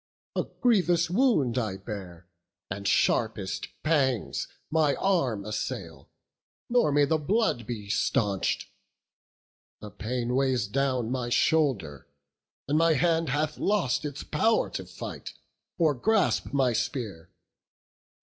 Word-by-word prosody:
A - - 0 0.2
grievous 175 -8 +3
wound 180 - +2
I 105 -5 -2
bear, 95 -4 -8 0.5
and 100 +1 -3
sharpest 100 -5 +1 0.2
pangs 135 -8 +1 0.2
My 155 -3 +3
arm 130 - 0
assail, 85 -8 -5 0.6
nor 240 -11 +3
may 145 0 +4
the 155 +2 +1
blood 175 - +1
he 110 -4 -5
stanch'd: 105 -2 0 1.1
The 105 - -9
pain 120 +4 -3
weighs 130 -4 +2
down 125 +1 0
my 125 -2 -2
shoulder; 120 - +1 0.6
and 150 +3 +2
my 165 0 +4
hand 165 +1 +2
Hath 150 +3 -1
lost 175 - +1
its 145 -1 -5
pow'r 220 +9 +1
to - - -5
fight, - - -8 0.4
or 160 -4 +3
grasp 215 - +1
my 135 -3 +2
spear. 100 - -3
130 Hz, 120 wpm, -27 LUFS, 105-160 Hz, 1.1 s, may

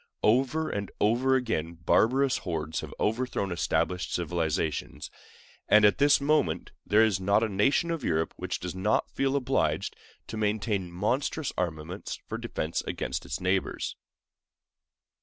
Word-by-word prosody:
Over 135 +8 +2
and 100 -1 -3
over 125 +5 +3
again 85 -10 -1
barbarous 125 +11 +2
hordes 80 -3 -3
have - - -7
overthrown 110 -3 -1
established 90 +1 0
civilizations; 80 -1 -2 0.6
and 105 0 +7
at 105 - +4
this 145 0 +5
moment 140 - +1
there 110 +2 +4
is 105 -5 +2
not 100 +3 +3
a - - +2
nation 110 - +2
of 165 -5 -3
Europe 80 -4 0
which - - -4
does 90 0 -5
not 95 +3 0
feel 135 0 0
obliged 135 -3 0 0.3
to 110 - -6
maintain 105 -3 -1
monstrous 130 - -1
armaments 85 +2 -4
for - - -5
defense 80 +2 -2
against 65 - -3
its - - -3
neighbors. 95 0 -1
105 Hz, 140 wpm, -28 LUFS, 85-125 Hz, 0.6 s, and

